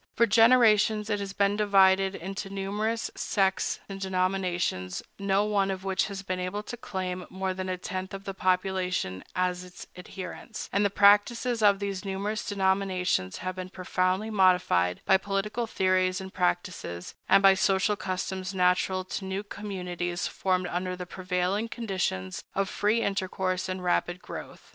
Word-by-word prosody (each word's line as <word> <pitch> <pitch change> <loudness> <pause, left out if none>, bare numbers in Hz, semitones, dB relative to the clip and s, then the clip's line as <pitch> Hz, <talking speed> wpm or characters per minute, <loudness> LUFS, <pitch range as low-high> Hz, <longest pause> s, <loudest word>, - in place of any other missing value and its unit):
For 235 - +5
generations 220 -1 +5
it 205 - +1
has 200 -1 -4
been 200 +1 +2
divided 195 -2 +4
into 195 +3 -5
numerous 205 +3 -2
sects 190 -2 0
and 195 -1 -7
denominations, 185 - -1 0.2
no 200 +1 +2
one 200 -2 +1
of 190 -1 -3
which 195 -1 0
has 200 -1 -6
been 185 -1 -3
able 185 +3 -3
to 240 - -6
claim 185 -5 -4
more 190 0 -2
than 185 0 -4
a 185 - -2
tenth 185 +1 -5
of 195 - -8
the 195 - -5
population 185 - 0
as 180 0 0
its 180 0 -11
adherents; 190 +5 -7
and 200 +2 +3
the 205 - +3
practices 210 +4 +4
of 205 -2 +5
these 200 -1 -4
numerous 200 +2 -3
denominations 190 - 0
have 185 0 -2
been 185 0 -6
profoundly 185 +3 -1
modified 180 - +3
by 190 - +6
political 205 +4 -2
theories 185 -2 +1
and 190 0 -8
practices, 175 - -2 0.2
and 195 - +6
by 195 0 +8
social 195 +1 +2
customs 190 0 -4
natural 185 +1 +2
to 185 +1 -5
new 190 +1 -3
communities 180 -4 -4
formed 185 -1 0
under 180 +1 -2
the 180 0 -6
prevailing 185 +4 -1
conditions 185 - -3
of 195 0 +1
free 220 +3 +1
intercourse 185 -1 -1
and 185 0 -4
rapid 175 0 0
growth. - - -9
190 Hz, 160 wpm, -28 LUFS, 185-200 Hz, 0.2 s, by